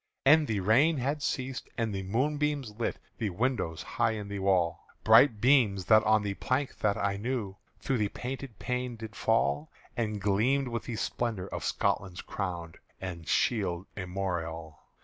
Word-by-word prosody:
And 150 Hz, +2 st, +6 dB
the 105 Hz, -3 st, 0 dB
rain 135 Hz, -, +4 dB
had 140 Hz, +4 st, -1 dB
ceased, 130 Hz, -2 st, -3 dB
and 115 Hz, -2 st, -1 dB
the 95 Hz, -, -2 dB
moonbeams 140 Hz, +5 st, 0 dB
lit 115 Hz, -, -1 dB, 0.2 s
The 110 Hz, -, 0 dB
window 105 Hz, -4 st, -1 dB
high 110 Hz, -, -1 dB
in 105 Hz, -2 st, -5 dB
the 100 Hz, 0 st, -4 dB
wall 95 Hz, -4 st, +1 dB, 0.2 s
Bright 110 Hz, 0 st, +6 dB
beams 115 Hz, -7 st, +4 dB
that 110 Hz, +3 st, +6 dB
on 110 Hz, -1 st, +4 dB
the 100 Hz, -1 st, -1 dB
plank 130 Hz, +6 st, -2 dB
that 105 Hz, 0 st, +1 dB
I 100 Hz, -1 st, 0 dB
knew 105 Hz, -3 st, -3 dB, 0.2 s
Through 135 Hz, -3 st, -1 dB
the 105 Hz, -1 st, +1 dB
painted 130 Hz, -2 st, -6 dB
pane 125 Hz, -1 st, -2 dB
did 110 Hz, -1 st, -9 dB
fall 75 Hz, -10 st, +1 dB, 0.3 s
And 110 Hz, -3 st, -1 dB
gleamed 115 Hz, +8 st, +2 dB
with 115 Hz, -1 st, -4 dB
the 120 Hz, -, -4 dB
splendour 110 Hz, -4 st, -2 dB
of -, -, -5 dB
Scotland's 95 Hz, -2 st, -1 dB
crown 85 Hz, -4 st, -4 dB, 0.3 s
And 85 Hz, -3 st, -6 dB
shield 95 Hz, -6 st, +1 dB
armorial. 85 Hz, -5 st, -4 dB
110 Hz, 165 wpm, -29 LUFS, 95-125 Hz, 0.3 s, And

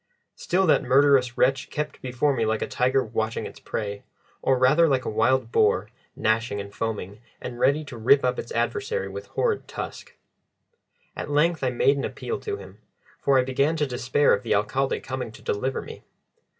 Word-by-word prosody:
Still 185 Hz, +2 st, +1 dB
that 160 Hz, -, +4 dB
murderous 130 Hz, -1 st, +3 dB
wretch 135 Hz, 0 st, +2 dB
kept 150 Hz, 0 st, -4 dB
before 130 Hz, +3 st, 0 dB
me 115 Hz, -, 0 dB
like 110 Hz, 0 st, 0 dB
a -, -, -3 dB
tiger 130 Hz, +2 st, +1 dB
watching 110 Hz, 0 st, -2 dB
its -, -, -9 dB
prey, 100 Hz, -2 st, -4 dB, 0.4 s
or 135 Hz, -, +2 dB
rather 145 Hz, +7 st, +5 dB
like 135 Hz, -3 st, +1 dB
a -, -, -2 dB
wild 115 Hz, +2 st, +1 dB
boar, -, -, +2 dB, 0.3 s
gnashing 110 Hz, -1 st, 0 dB
and 100 Hz, 0 st, -7 dB
foaming, 105 Hz, -2 st, -4 dB, 0.2 s
and 120 Hz, -1 st, -7 dB
ready 145 Hz, +4 st, +3 dB
to 130 Hz, -4 st, -9 dB
rip 135 Hz, +5 st, +5 dB
up 125 Hz, 0 st, 0 dB
its -, -, -7 dB
adversary 455 Hz, +1 st, -1 dB
with -, -, -8 dB
horrid 445 Hz, -4 st, -1 dB
tusk. -, -, -7 dB, 1.0 s
At -, -, -5 dB
length 150 Hz, +2 st, +2 dB
I 130 Hz, -, +2 dB
made 135 Hz, +3 st, +2 dB
an 140 Hz, -, -2 dB
appeal 450 Hz, -, -4 dB
to 415 Hz, -2 st, -4 dB
him, -, -, -13 dB, 0.4 s
for 140 Hz, -1 st, +3 dB
I 130 Hz, -, +4 dB
began 140 Hz, +5 st, +1 dB
to 150 Hz, -2 st, +1 dB
despair 130 Hz, +2 st, +2 dB
of 100 Hz, -, +1 dB
the -, -, 0 dB
Alcalde 130 Hz, +7 st, 0 dB
coming 130 Hz, -3 st, -5 dB
to -, -, -14 dB
deliver 130 Hz, +6 st, -2 dB
me. -, -, -10 dB
130 Hz, 190 wpm, -25 LUFS, 115-145 Hz, 1.0 s, rather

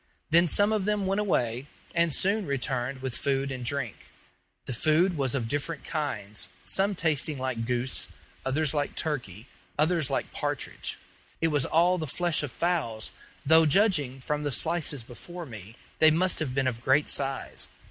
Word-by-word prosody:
Then 170 Hz, +2 st, +6 dB
some 205 Hz, +6 st, +3 dB
of 210 Hz, -3 st, 0 dB
them 210 Hz, -1 st, 0 dB
went 195 Hz, +2 st, +1 dB
away, 125 Hz, -, 0 dB, 0.3 s
and 170 Hz, -1 st, +2 dB
soon 200 Hz, +6 st, +1 dB
returned 130 Hz, -1 st, -1 dB
with 130 Hz, -2 st, -3 dB
food 135 Hz, 0 st, -1 dB
and 130 Hz, -2 st, -5 dB
drink. 125 Hz, -3 st, -4 dB, 0.6 s
The 130 Hz, -, -4 dB
food 160 Hz, -, +2 dB
was 135 Hz, -3 st, 0 dB
of 120 Hz, -4 st, -1 dB
different 145 Hz, +6 st, -3 dB
kinds 115 Hz, -10 st, -2 dB
some 195 Hz, +1 st, +3 dB
tasting 155 Hz, -3 st, 0 dB
like 130 Hz, -3 st, -3 dB
goose, 125 Hz, +1 st, -1 dB, 0.4 s
others 140 Hz, +2 st, +1 dB
like 145 Hz, -1 st, -1 dB
turkey, 120 Hz, -, -3 dB, 0.3 s
others 155 Hz, -1 st, +2 dB
like 135 Hz, -, -2 dB
partridge. -, -, -3 dB, 0.4 s
It 165 Hz, -, +2 dB
was 145 Hz, -4 st, +2 dB
all 175 Hz, +3 st, +3 dB
the 155 Hz, -, -3 dB
flesh 175 Hz, +4 st, 0 dB
of 145 Hz, -, -3 dB
fowls, 145 Hz, -12 st, -1 dB, 0.3 s
though, 160 Hz, +2 st, +6 dB
judging 150 Hz, -, +2 dB
from 150 Hz, +3 st, -2 dB
the 145 Hz, -, -1 dB
slices 155 Hz, -2 st, +2 dB
before 175 Hz, +9 st, -9 dB
me, 110 Hz, -4 st, -10 dB, 0.2 s
they 155 Hz, -, +7 dB
must 180 Hz, +4 st, +2 dB
have 135 Hz, -5 st, -3 dB
been 135 Hz, -1 st, +1 dB
of 120 Hz, -2 st, -2 dB
great 135 Hz, +4 st, +3 dB
size. 135 Hz, -1 st, 0 dB
145 Hz, 170 wpm, -28 LUFS, 130-170 Hz, 0.6 s, they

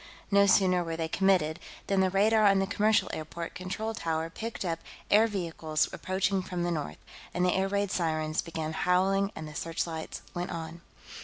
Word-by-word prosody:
No 200 Hz, 0 st, +6 dB
sooner 185 Hz, -2 st, +4 dB
were 165 Hz, -1 st, -4 dB
they 165 Hz, -1 st, -1 dB
committed 175 Hz, -3 st, +2 dB, 0.3 s
than 195 Hz, -1 st, +1 dB
the 190 Hz, 0 st, +4 dB
radar 210 Hz, +3 st, +4 dB
on 195 Hz, -1 st, +5 dB
the 195 Hz, -, +2 dB
commercial 210 Hz, +2 st, +2 dB
airport 165 Hz, +2 st, -5 dB
control 190 Hz, +5 st, -4 dB
tower 165 Hz, -4 st, -2 dB
picked 225 Hz, +1 st, -5 dB
up 165 Hz, -2 st, -1 dB, 0.3 s
air 215 Hz, +2 st, +6 dB
vehicles 165 Hz, -6 st, -1 dB
approaching 190 Hz, +1 st, 0 dB
from 180 Hz, -1 st, -3 dB
the 175 Hz, -, 0 dB
north, 150 Hz, -, -3 dB, 0.4 s
and 180 Hz, 0 st, +2 dB
the 180 Hz, -, +3 dB
air 190 Hz, 0 st, +1 dB
raid 200 Hz, 0 st, 0 dB
sirens 155 Hz, -2 st, 0 dB
began 160 Hz, -2 st, -4 dB
howling 195 Hz, +3 st, +2 dB
and 155 Hz, -, -6 dB
the 155 Hz, -, -9 dB
searchlights 165 Hz, 0 st, -4 dB
went 175 Hz, 0 st, -3 dB
on. 165 Hz, +1 st, -6 dB
180 Hz, 180 wpm, -29 LUFS, 165-195 Hz, 0.4 s, No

